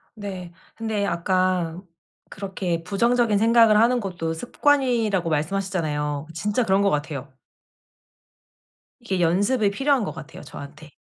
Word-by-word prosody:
네. 190 -4 -7 0.2
근데 220 -3 -2
아까 185 -2 0 0.5
그렇게 190 -4 -3
'부정적인 230 +3 +2
생각을 225 0 +5
하는 245 +2 +4
것도 175 -6 -3
습관.'이라고 235 - +1
말씀하셨잖아요. 155 -3 -2
진짜 210 +8 0
그런 195 -2 +2
것 200 - +3
같아요. 145 -3 -3 1.7
이게 195 -6 -3
연습이 200 +6 +2
필요한 270 +3 +1
것 190 - -3
같아요 160 -1 -10
저한테. 150 +2 -11
195 Hz, 290 characters per minute, -23 LUFS, 165-220 Hz, 1.7 s, 생각을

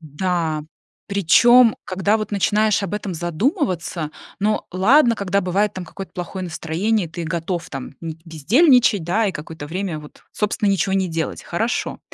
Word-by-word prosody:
Да. 160 0 -2 0.4
Причём, 230 +5 +5
когда 195 +3 +1
вот 215 -1 -5
начинаешь 210 +1 +2
об 195 - -4
этом 205 -3 -3
задумываться, 175 - -1 0.3
ну, 215 +2 +1
ладно, 235 - +4
когда 200 -1 0
бывает 200 +3 0
там 185 -3 -7
какое-то 190 +4 -9
плохое 185 +1 -5
настроение, 175 +4 -1
ты 170 +1 -6
готов 170 +1 -3
там 135 -1 -6
н 165 -1 -4
бездельничать, 215 - +4
да, 205 +7 +1
и 195 - -1
какое-то 160 -1 -8
время 180 0 -3
вот, 150 -1 -13
собственно, 210 0 0
ничего 195 0 +1
не 190 -1 +1
делать, 165 -1 -3
хорошо. 225 +8 -2
185 Hz, 155 wpm, -21 LUFS, 165-210 Hz, 0.4 s, Причём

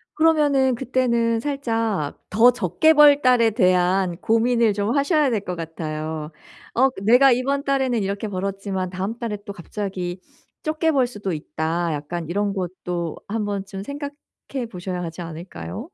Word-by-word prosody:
그러면은 290 -5 +3
그때는 235 -2 +1
살짝 225 - -2
더 230 +5 +6
적게 240 - +3
벌 295 -1 +7
달에 245 -3 +4
대한 185 -3 +2
고민을 230 0 +2
좀 205 +6 -1
하셔야 290 0 +3
될 220 -4 0
것 180 - -2
같아요. 155 -1 -5 0.4
어 265 +3 +4
그 250 - -11
'내가 250 +5 +6
이번 275 +3 +1
달에는 265 -5 +1
이렇게 200 +2 -3
벌었지만 195 -1 -3
다음 190 +5 -4
달에 220 -4 -3
또 200 - -6
갑자기 185 -1 -5 0.4
적게 315 +1 +1
벌 265 -4 +2
수도 205 -6 -4
있다.' 160 +2 -2
약간 150 +3 -5
이런 205 +2 0
것도 180 -3 -4
한 215 0 -2
번쯤 195 -1 -4
생각해 280 -1 -7
보셔야 180 -1 -4
하지 165 +1 -6
않을까요? 160 - -7
205 Hz, 305 characters per minute, -22 LUFS, 180-255 Hz, 0.4 s, 벌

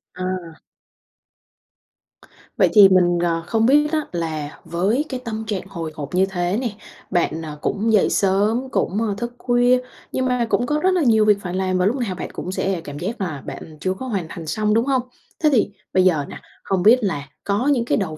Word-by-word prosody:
À. 185 -3 -4 2.0
Vậy - - +4
thì 200 -3 +9
mình, 175 -2 +3
ờ, 165 -1 0
không 225 -1 +2
biết 295 +4 +4
á 310 -1 +1
là 155 -4 -4
với 205 - 0
cái 260 -2 -3
tâm 220 -1 -4
trạng 195 -3 -3
hồi 165 -5 -5
hộp 145 +3 -6
như 190 +1 +4
thế 180 +1 -1
nè, 245 - -1 0.4
bạn, 170 -3 0
ờ, 150 -2 -7
cũng 220 +3 0
dậy 205 - +4
sớm 210 +7 +1
cũng 200 - -1 0.2
thức 240 0 -4
khuya, 245 0 +3 0.3
nhưng 260 - -1
mà 250 -2 +1
cũng 245 - +1
có 300 +3 0
rất 375 - +4
là 360 - +2
nhiều 220 -3 +4
việc 210 -1 +5
phải 180 -1 -5
làm 185 -1 0
và 180 - +2
lúc 225 +6 +2
nào 225 -8 -2
bạn - - -6
cũng 185 - -5
sẽ 190 -2 -1
cảm 145 -2 -8
giác 205 +5 -4
là 155 -7 -4
bạn 155 -1 -8
chưa 185 0 -1
có 260 +7 -7
hoàn 195 -8 -2
thành 165 -3 -8
xong, 210 +4 0
đúng 230 +3 +2
hông? 265 -2 +2 0.4
Thế 305 - +6
thì 215 -4 +2 0.2
bây 185 - +4
giờ 155 -6 +3
nè, - - -9 0.2
hông 190 -2 0
biết 235 +4 +7
là 145 -8 -2
có 210 +7 0
những 250 -5 +2
cái - - +1
đầu 160 -7 -3
195 Hz, 215 wpm, -21 LUFS, 175-235 Hz, 2.0 s, thì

